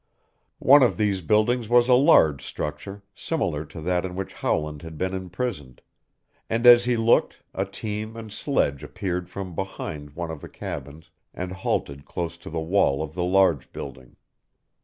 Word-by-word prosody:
One 140 +2 +7
of 125 - +3
these 100 -3 +1
buildings 110 +5 +2
was 120 0 +5
a 125 - +5
large 125 - +5
structure 95 +7 -6
similar 90 - -2
to 80 - -10
that 90 +2 0
in 90 -1 -5
which 95 0 -5
Howland 75 -1 -2
had 80 -2 -9
been 95 +3 -2
imprisoned, 90 - -4 0.7
and 115 +2 0
as 120 0 +9
he 125 -1 +1
looked 115 +1 +2
a 95 - -1
team 105 +3 -5
and 110 -2 -8
sledge 75 - 0
appeared 90 +3 -4
from 95 -1 -6
behind 75 -5 -6
one 85 -1 -4
of 80 -3 -8
the - - -9
cabins 75 +4 -8 0.2
and 90 0 -4
halted 70 -6 -3
close 85 -1 -4
to - - -10
the 80 - -3
wall 80 -4 +2
of 80 -1 -7
the 90 +1 -2
large 90 -5 +2
building. 65 -1 -9
90 Hz, 170 wpm, -25 LUFS, 80-110 Hz, 0.7 s, as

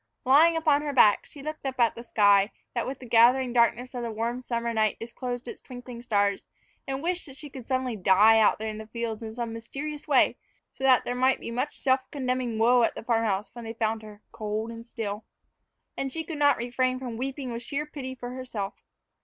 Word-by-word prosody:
Lying 315 +6 +6
upon 305 -3 +3
her 295 -1 -3
back, 215 -6 +5
she 285 -3 -12
looked 310 +1 -6
up 265 -2 -4
at 235 -2 +4
the 235 - -9
sky, 205 -3 +4 0.2
that 235 - -2
with 270 - -4
the 255 - -11
gathering 245 +2 +4
darkness 240 +1 +2
of 245 - -4
the 235 - -3
warm 230 +3 -2
summer 235 -2 -2
night 215 -1 +1
disclosed 245 +1 -5
its - - -8
twinkling 245 -1 -9
stars, 205 -4 0 0.4
and 270 +1 -3
wished 355 0 -2
that 270 - -11
she 290 0 -9
could 255 -4 -10
suddenly 255 -3 -1
die 210 +3 +5
out 215 - +4
there 220 - -4
in 215 - -7
the 220 - -9
field 230 -1 -4
in 220 -1 -7
some 235 -2 -4
mysterious 280 +6 -6
way, - - +4 0.3
so - - -11
that 260 -2 +5
there 245 - -1
might 255 +1 +2
be - - -6
much 255 +5 -2
self 260 0 +3
condemning 255 -4 -2
woe 240 +2 +5
at 230 - +2
the - - -7
farm 230 -1 +1
house 200 -1 -1
when 240 - -8
they 225 0 -6
found 220 -1 -1
her, 210 -1 -13
cold 220 0 -3
and 230 +1 -10
still. 215 -3 -5 0.7
And 270 - -3
she 320 +4 -3
could 315 -2 -6
not 285 -1 +4
refrain 255 +2 0
from 250 -3 -6
weeping 265 +1 -4
with 235 0 -5
sheer 285 +4 -3
pity 265 -3 -7
for 245 -1 -7
herself. 250 -6 -5
245 Hz, 225 wpm, -27 LUFS, 225-265 Hz, 0.7 s, Lying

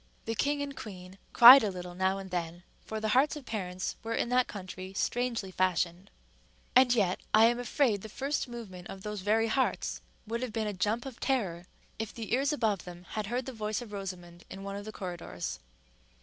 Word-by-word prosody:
The 225 - -1
king 285 +6 0
and 280 -1 -6
queen 190 -4 -9
cried 250 +3 +11
a 210 - +1
little 180 -1 -7
now 190 +1 +1
and 190 -1 -8
then, 175 0 -3 0.2
for 220 - -4
the 215 0 -1
hearts 265 +7 +3
of 295 -3 -9
parents 185 -5 -4
were 230 +1 -3
in 235 - 0
that 250 0 +3
country 185 -1 -7
strangely 235 -4 -1
fashioned; 185 0 0 0.7
and 255 -1 +7
yet 200 -7 +2 0.2
I 220 +1 +8
am 240 +1 +3
afraid 245 -4 +1
the 220 - -8
first 275 +5 -2
movement 205 -7 -8
of 195 0 -9
those 210 -2 -4
very 220 +3 +2
hearts 255 +4 0 0.2
would 230 +2 -3
have 250 -4 -4
been 220 -1 -1
a 210 - -2
jump 210 +6 -1
of 260 -3 -8
terror 185 -10 -1 0.3
if 220 -1 -4
the 225 -1 -4
ears 275 +4 +2
above 220 -9 0
them 175 0 -10
had 215 -2 -3
heard 245 +3 -2
the 265 - -6
voice 215 -1 -2
of 240 -4 -9
Rosamond 175 -3 -7
in 195 +1 -8
one 200 0 -5
of 205 0 -6
the 215 - -6
corridors. 175 - -5
210 Hz, 205 wpm, -30 LUFS, 185-240 Hz, 0.7 s, cried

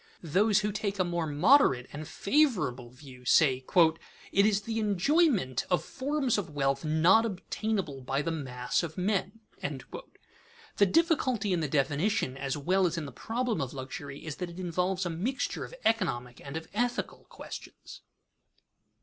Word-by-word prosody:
Those 200 +6 +3
who 210 0 -1
take 200 -1 -3
a 185 - +3
more 170 -2 -2
moderate 145 - +4
and 150 +1 -6
favorable 195 - +1
view 125 0 -14
say: 130 0 +4 0.7
"It 200 +2 +4
is 205 -1 +2
the 225 +2 -3
enjoyment 210 - +2
of 180 - +2
forms 270 -4 -1
of 180 -5 -5
wealth 140 -1 0
not 165 +8 +4
obtainable 195 -7 -3
by 135 +3 -1
the 165 - -1
mass 125 -6 -2
of 165 -3 -6
men." 195 +3 -1 1.4
The 200 - +5
difficulty 255 - +2
in 175 - +1
the 155 - -1
definition 145 +3 0
as 135 +1 -3
well 185 +6 +2
as 170 0 -3
in 160 - -3
the 140 - -7
problem 230 - -2
of 135 0 -4
luxury 135 +2 -7
is 155 -3 -5
that 180 -1 -4
it 170 +2 -10
involves 180 +1 -1
a 175 - -2
mixture 215 +12 -2
of - - -11
economic 125 - 0
and 140 +2 -5
of 160 0 -7
ethical 245 +3 -2
questions. - - -10
180 Hz, 160 wpm, -29 LUFS, 140-215 Hz, 1.4 s, The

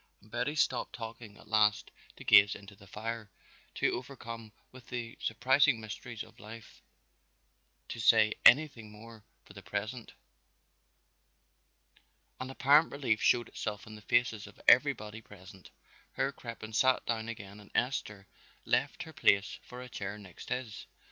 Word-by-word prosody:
And 105 - -22
Betty 125 +5 -1
stopped 130 -4 0
talking 115 -2 -9
at - - -17
last 105 -1 +2 0.2
to - - -11
gaze 100 +1 +7
into 100 0 -12
the 100 0 -17
fire, 110 +1 -5 0.5
too - - +1
overcome 115 -4 -7 0.2
with 130 -2 -15
the 120 -2 -5
surprising 130 +2 +3
mysteries 110 +1 -7
of 110 +1 -18
life 110 +1 -12 1.1
to - - -6
say 110 -1 +5
anything 125 -5 +5
more 110 +1 -13 0.2
for - - -15
the 100 - -11
present. 110 +4 -5 2.3
An 130 - -5
apparent 145 +4 +4
relief 130 -6 0
showed 120 -2 +3
itself 105 -1 -5
in 110 - -11
the 105 - -11
faces 110 -2 +1
of - - -16
everybody 110 +1 +4
present. 95 -3 -14 0.4
Herr 135 - 0
Crippen 115 -4 -9
sat 130 +3 +3
down 115 -1 -2
again 100 -2 -8
and 105 - -15
Esther 105 -6 -1 0.4
left - - 0
her - - -12
place 100 0 +2
for 125 0 -10
a - - -9
chair 100 -4 -6
next 95 -5 -12
his. 125 -4 -4
110 Hz, 150 wpm, -31 LUFS, 105-125 Hz, 2.3 s, gaze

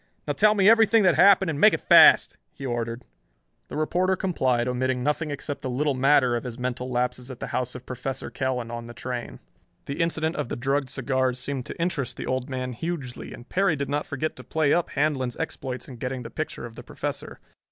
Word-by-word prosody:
"Now 145 - -1
tell 215 +8 +4
me 195 -1 +4
everything 225 -1 +6
that 180 -2 +5
happened 190 +2 +5
and 145 - -4
make - - +7
it - - -9
fast," - - +7 0.2
he 135 - -9
ordered. 120 -1 -3 0.6
The - - -6
reporter 180 +5 +1
complied, 130 -11 0
omitting 125 0 -1
nothing 150 +2 0
except 145 0 -5
the 130 - -4
little 140 +3 0
matter 130 -2 +3
of 120 - -3
his 120 -2 -6
mental 125 0 -3
lapses 125 0 -2
at 130 -2 -8
the - - -4
house 125 -1 -1
of 125 0 -9
Professor 130 +1 -5
Kell 130 -2 -1
and 115 -1 -6
later 120 - -4
on 115 - -10
the 120 - -10
train. 125 +1 -5 0.5
The 140 +4 -3
incident 160 -1 0
of - - -3
the - - -3
drugged 135 +2 -1
cigars 130 -1 0
seemed 130 0 -4
to - - -8
interest 165 -7 -2
the - - -5
Old 130 +1 -2
Man 130 -1 -3
hugely, 140 -2 -5
and 120 - -11
Perry 195 -4 +2
did 140 -1 -3
not 145 +1 -1
forget 150 +3 -3
to - - -10
play 155 -3 +1
up 175 - +1
Handlon's 135 -4 -1
exploits 130 -5 -5
in 125 - -10
getting 125 +1 -4
the 115 - -9
picture 155 -3 -5
of 120 - -9
the - - -10
Professor. - - -6
130 Hz, 225 wpm, -25 LUFS, 125-155 Hz, 0.6 s, make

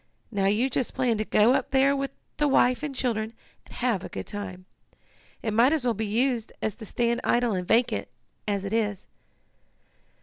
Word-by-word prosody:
Now 200 -3 0
you 215 +6 +3
just 260 -1 -2
plan 245 -4 +1
to - - +1
go 215 +4 +4
up - - 0
there 270 +1 +4
with 275 0 -2 0.3
the 295 - +2
wife 255 -2 +3
and 295 -2 -4
children, 225 -3 -1 0.3
and - - -13
have 235 -7 0
a - - -6
good - - -6
time. 185 -3 -6 0.8
It 220 - -1
might 240 +7 +5
as 310 -5 0
well 240 - +2
be 220 0 -3
used 235 +1 0
as 220 - -1
to 220 -3 -9
stand 235 +2 0
idle 240 -2 +2
and 180 -2 -3
vacant, 225 - +2 0.4
as 200 -1 -1
it 200 - -4
is." 210 -4 -1
230 Hz, 195 wpm, -26 LUFS, 210-255 Hz, 0.8 s, might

